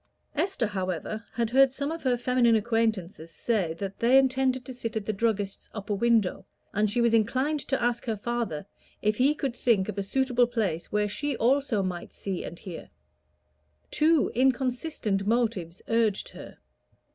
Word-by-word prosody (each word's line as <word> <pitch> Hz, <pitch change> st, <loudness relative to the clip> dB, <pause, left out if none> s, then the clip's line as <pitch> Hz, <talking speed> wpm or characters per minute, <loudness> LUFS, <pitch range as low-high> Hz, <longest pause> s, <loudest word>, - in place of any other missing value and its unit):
Esther, 335 Hz, -4 st, 0 dB
however, 190 Hz, +1 st, -3 dB
had 235 Hz, -1 st, -1 dB
heard 270 Hz, +1 st, +6 dB
some 280 Hz, +3 st, -3 dB
of 330 Hz, 0 st, -5 dB
her 250 Hz, -2 st, +1 dB
feminine 245 Hz, -1 st, +3 dB
acquaintances 220 Hz, -7 st, -1 dB
say 180 Hz, -3 st, -1 dB
that 195 Hz, +2 st, -6 dB
they 245 Hz, +3 st, +5 dB
intended 260 Hz, -1 st, +2 dB
to 260 Hz, -, -6 dB
sit 230 Hz, -2 st, -5 dB
at 215 Hz, -2 st, -2 dB
the 215 Hz, -, -1 dB
druggist's 205 Hz, -2 st, -1 dB
upper 205 Hz, 0 st, -3 dB
window, 220 Hz, -2 st, +2 dB, 0.3 s
and 210 Hz, +1 st, +2 dB
she 225 Hz, -, -1 dB
was 235 Hz, -1 st, +3 dB
inclined 260 Hz, +7 st, +2 dB
to 270 Hz, -1 st, -1 dB
ask 240 Hz, 0 st, 0 dB
her 225 Hz, -3 st, -1 dB
father 220 Hz, -8 st, -3 dB, 0.4 s
if 215 Hz, 0 st, +2 dB
he 275 Hz, +4 st, +3 dB
could 270 Hz, -5 st, -3 dB
think 215 Hz, -7 st, +2 dB
of 210 Hz, -2 st, -4 dB
a -, -, +1 dB
suitable 245 Hz, +3 st, +2 dB
place 200 Hz, -9 st, -2 dB
where 210 Hz, 0 st, +1 dB
she 285 Hz, +7 st, -2 dB
also 250 Hz, -4 st, +2 dB
might 180 Hz, -2 st, -5 dB
see 195 Hz, -3 st, -4 dB
and 170 Hz, -, -7 dB
hear. 180 Hz, -4 st, -9 dB, 1.0 s
Two 310 Hz, 0 st, +3 dB
inconsistent 250 Hz, -5 st, 0 dB
motives 215 Hz, -7 st, 0 dB
urged 225 Hz, -3 st, +1 dB
her. -, -, -11 dB
230 Hz, 170 wpm, -27 LUFS, 200-255 Hz, 1.0 s, heard